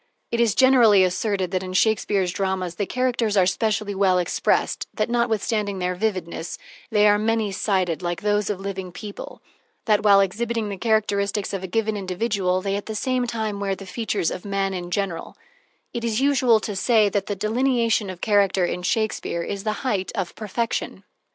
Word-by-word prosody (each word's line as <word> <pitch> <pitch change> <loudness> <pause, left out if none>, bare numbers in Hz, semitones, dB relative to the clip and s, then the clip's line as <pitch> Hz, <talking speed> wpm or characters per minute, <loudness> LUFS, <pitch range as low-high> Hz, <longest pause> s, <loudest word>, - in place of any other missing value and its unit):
It 235 - 0
is 230 -3 +3
generally 240 -7 +6
asserted 185 0 0
that 185 -1 0
in 185 -1 -6
Shakespeare's 195 -2 +2
dramas 190 -2 -2
the 195 +3 -3
characters 240 -4 0
are 185 - +5
specially 210 +2 0
well 190 -2 +3
expressed, 180 -1 0
that, 215 +1 -1
notwithstanding 220 -3 0
their 180 0 -1
vividness, 180 -4 -3 0.3
they 210 -1 +4
are 205 0 +4
many 220 -1 0
sided, 185 -4 0
like 175 -1 -3
those 210 -1 +1
of 205 -3 -2
living 190 -2 -5
people; 205 +3 -9 0.4
that, 210 -2 +3
while 200 -2 +6
exhibiting 220 +3 -1
the 200 - -5
characteristics 205 -2 0
of 195 -1 -3
a - - -3
given 220 +3 0
individual, 185 -1 -1
they 195 -1 -1
at 200 - -5
the 220 - -4
same 255 +2 0
time 220 -3 -3
wear 195 -1 -1
the 195 - -10
features 200 -3 -2
of - - -6
man 195 -1 -1
in 175 -1 -5
general; 180 -2 -3 0.6
it 235 - -4
is 230 -1 0
usual 260 -5 +4
to 210 - -4
say 215 +1 +3
that 200 -1 -1
the 205 - -2
delineation 230 0 +1
of 185 -2 -8
character 200 -3 +3
in 180 - -3
Shakespeare 200 -3 -1
is 200 +3 -5
the 215 - +1
height 200 -7 -1
of 185 -3 -3
perfection. 225 +2 -3
205 Hz, 185 wpm, -23 LUFS, 190-220 Hz, 0.6 s, generally